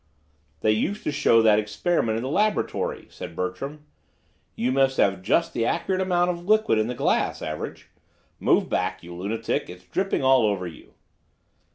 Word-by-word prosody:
"They 110 Hz, -, +3 dB
used 195 Hz, -, -1 dB
to -, -, -1 dB
show 115 Hz, -5 st, +4 dB
that 105 Hz, -1 st, +5 dB
experiment 110 Hz, +3 st, 0 dB
in 115 Hz, -, -3 dB
the 130 Hz, -, -3 dB
laboratory," 210 Hz, +7 st, 0 dB
said 85 Hz, -, -8 dB
Bertram. 135 Hz, -, -4 dB, 0.7 s
"You 125 Hz, +2 st, 0 dB
must 135 Hz, 0 st, +2 dB
have 100 Hz, -, +4 dB
had 95 Hz, -, -13 dB
just 130 Hz, -, +1 dB
the 115 Hz, -, 0 dB
accurate 190 Hz, +10 st, 0 dB
amount 180 Hz, -1 st, +2 dB
of 170 Hz, -1 st, -7 dB
liquid 215 Hz, -, +3 dB
in 110 Hz, -, +1 dB
the 125 Hz, -, -3 dB
glass, -, -, 0 dB
Average. 75 Hz, 0 st, -6 dB, 0.5 s
Move -, -, +3 dB
back, -, -, -2 dB
you 85 Hz, +1 st, -9 dB
lunatic, 100 Hz, +6 st, -2 dB
it's 90 Hz, +1 st, -11 dB
dripping 190 Hz, -, -1 dB
all 130 Hz, -2 st, +5 dB
over 100 Hz, -3 st, -1 dB
you." 85 Hz, -, -11 dB
120 Hz, 175 wpm, -25 LUFS, -, 0.7 s, that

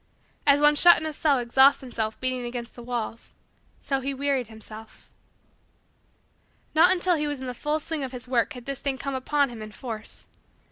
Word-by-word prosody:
As 280 Hz, 0 st, +6 dB
one 295 Hz, 0 st, +5 dB
shut 345 Hz, +3 st, +7 dB
in 315 Hz, -, -4 dB
a 310 Hz, -, -3 dB
cell 295 Hz, -2 st, +2 dB
exhausts 265 Hz, +3 st, +4 dB
himself 225 Hz, -4 st, -4 dB
beating 255 Hz, -1 st, -2 dB
against 240 Hz, 0 st, -6 dB
the 240 Hz, -, -11 dB
walls, 235 Hz, -1 st, -5 dB, 0.5 s
so 270 Hz, -1 st, -1 dB
he 275 Hz, +1 st, -3 dB
wearied 275 Hz, -3 st, 0 dB
himself. 220 Hz, 0 st, -12 dB, 1.6 s
Not 335 Hz, +4 st, +6 dB
until 360 Hz, -1 st, +3 dB
he 300 Hz, 0 st, -1 dB
was 290 Hz, -2 st, -3 dB
in 260 Hz, -, -6 dB
the 250 Hz, -, -4 dB
full 300 Hz, +5 st, -2 dB
swing 310 Hz, -1 st, -3 dB
of 260 Hz, -, -4 dB
his 250 Hz, -1 st, -6 dB
work 245 Hz, -2 st, +1 dB
had 250 Hz, -2 st, -10 dB
this 275 Hz, -1 st, -4 dB
thing 275 Hz, -2 st, -2 dB
come 275 Hz, +2 st, -4 dB
upon 280 Hz, +2 st, +1 dB
him 235 Hz, -2 st, -9 dB
in 215 Hz, 0 st, -8 dB
force. 220 Hz, -1 st, -8 dB
265 Hz, 195 wpm, -26 LUFS, 240-290 Hz, 1.6 s, shut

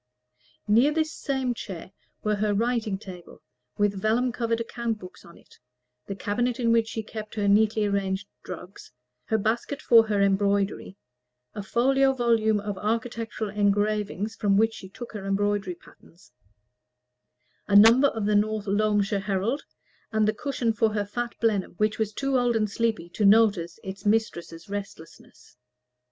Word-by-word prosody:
Near 235 Hz, +8 st, +4 dB
this 315 Hz, 0 st, -1 dB
same 265 Hz, -3 st, -2 dB
chair 190 Hz, -5 st, -8 dB, 0.3 s
were 210 Hz, -1 st, 0 dB
her 210 Hz, 0 st, 0 dB
writing 225 Hz, -2 st, 0 dB
table, 185 Hz, -3 st, -12 dB, 0.3 s
with 205 Hz, -2 st, 0 dB
vellum 235 Hz, +4 st, +1 dB
covered 230 Hz, -1 st, -1 dB
account 230 Hz, -1 st, -3 dB
books 185 Hz, -3 st, -12 dB
on 170 Hz, -, -15 dB
it, -, -, -21 dB, 0.5 s
the 195 Hz, -, -4 dB
cabinet 240 Hz, +5 st, -1 dB
in 230 Hz, -2 st, +2 dB
which 230 Hz, -1 st, +3 dB
she 220 Hz, 0 st, -4 dB
kept 215 Hz, 0 st, -8 dB
her 205 Hz, -2 st, 0 dB
neatly 215 Hz, +1 st, +3 dB
arranged 200 Hz, -1 st, -1 dB, 0.2 s
drugs, 180 Hz, +3 st, -10 dB, 0.3 s
her 220 Hz, -, +1 dB
basket 230 Hz, +7 st, -1 dB
for 230 Hz, -5 st, +5 dB
her 210 Hz, -2 st, 0 dB
embroidery, 200 Hz, 0 st, +1 dB, 0.6 s
a 205 Hz, -, -5 dB
folio 270 Hz, +6 st, +2 dB
volume 230 Hz, -4 st, +2 dB
of 205 Hz, -1 st, -5 dB
architectural 225 Hz, -1 st, -3 dB
engravings 210 Hz, +1 st, 0 dB
from 200 Hz, -1 st, +2 dB
which 225 Hz, +1 st, +3 dB
she 190 Hz, -, -10 dB
took 240 Hz, +4 st, -9 dB
her 210 Hz, -3 st, -7 dB
embroidery 200 Hz, -2 st, 0 dB
patterns, 170 Hz, +2 st, -21 dB, 1.4 s
a 200 Hz, -, +1 dB
number 230 Hz, +7 st, +8 dB
of 220 Hz, -6 st, -3 dB
the 210 Hz, -, +1 dB
"North 215 Hz, 0 st, +1 dB
Loamshire 205 Hz, 0 st, +1 dB
Herald," 200 Hz, +8 st, -1 dB, 0.5 s
and 215 Hz, -1 st, +2 dB
the 215 Hz, -, +2 dB
cushion 240 Hz, -2 st, -1 dB
for 220 Hz, 0 st, +1 dB
her 205 Hz, -1 st, 0 dB
fat 240 Hz, +4 st, -4 dB
Blenheim, 210 Hz, -6 st, 0 dB
which 215 Hz, +1 st, 0 dB
was 215 Hz, -1 st, 0 dB
too 275 Hz, +3 st, 0 dB
old 245 Hz, -1 st, +1 dB
and 215 Hz, -2 st, 0 dB
sleepy 220 Hz, -6 st, -1 dB
to 210 Hz, -, -3 dB
notice 200 Hz, -5 st, +4 dB
its 190 Hz, -1 st, -7 dB
mistress's 205 Hz, -5 st, -1 dB
restlessness. 195 Hz, -10 st, -9 dB
215 Hz, 155 wpm, -26 LUFS, 200-230 Hz, 1.4 s, number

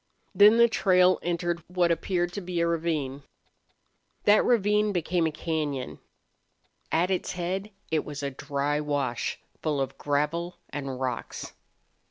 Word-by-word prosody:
Then 210 Hz, +2 st, +7 dB
the 235 Hz, 0 st, +7 dB
trail 185 Hz, -4 st, +4 dB
entered 175 Hz, 0 st, -1 dB
what 180 Hz, -1 st, +2 dB
appeared 175 Hz, +1 st, 0 dB
to 200 Hz, -, -4 dB
be 180 Hz, -1 st, -3 dB
a 170 Hz, -, +3 dB
ravine. 155 Hz, -5 st, -1 dB, 1.0 s
That 210 Hz, +1 st, +5 dB
ravine 210 Hz, -2 st, +3 dB
became 175 Hz, -1 st, +1 dB
a -, -, -2 dB
cañon. 150 Hz, -4 st, -3 dB, 0.9 s
At 175 Hz, +3 st, +2 dB
its 185 Hz, -, -1 dB
head 185 Hz, +3 st, -3 dB, 0.2 s
it 155 Hz, -1 st, +1 dB
was 145 Hz, -1 st, -7 dB
a 140 Hz, -, -2 dB
dry 140 Hz, +2 st, -1 dB
wash, 145 Hz, -5 st, -2 dB, 0.2 s
full 150 Hz, -3 st, 0 dB
of 135 Hz, -1 st, -3 dB
gravel 150 Hz, +5 st, -1 dB, 0.2 s
and 135 Hz, -3 st, -4 dB
rocks. 130 Hz, -1 st, -4 dB
170 Hz, 140 wpm, -27 LUFS, 145-180 Hz, 1.0 s, Then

